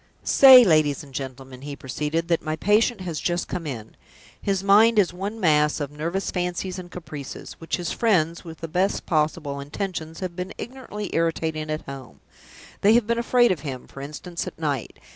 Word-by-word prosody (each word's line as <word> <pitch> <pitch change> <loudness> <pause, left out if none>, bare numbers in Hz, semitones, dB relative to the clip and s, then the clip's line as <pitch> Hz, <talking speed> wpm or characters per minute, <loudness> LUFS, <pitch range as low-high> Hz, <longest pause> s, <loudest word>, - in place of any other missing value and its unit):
"Say, 260 -3 +9
ladies 155 -5 +3
and 140 -2 -15
gentlemen," 130 -1 -7
he 145 0 -6
proceeded, 150 +5 -3
"that 170 - +2
my 155 -1 -2
patient 210 +5 +2
has 170 -4 -4
just 175 0 -1
come 165 -3 -4
in. 115 -6 -7 0.5
His 195 -1 -1
mind 215 +3 +6
is 190 -4 +3
one 200 +5 -5
mass 150 -4 +3
of 145 -1 -4
nervous 165 +6 -3
fancies 180 +1 -3
and 180 -1 -9
caprices, 155 -6 -8
which 165 - -2
his 175 -2 -3
friends 170 -7 +1
(with 165 -2 -10
the 165 - -4
best 185 +5 0
possible 155 -2 0
intentions) 160 +2 -5
have 180 -2 -4
been 180 +2 -5
ignorantly 240 -5 -6
irritating 160 -1 -1
at 155 0 -3
home. 130 - -10 0.6
They 210 +2 +6
have 240 -2 +4
been 235 +1 0
afraid 240 -1 +4
of 180 - -1
him, 135 -3 -6
for 135 - -11
instance, 150 +5 -6
at - - -8
night. 145 -6 -3
165 Hz, 185 wpm, -24 LUFS, 150-195 Hz, 0.6 s, Say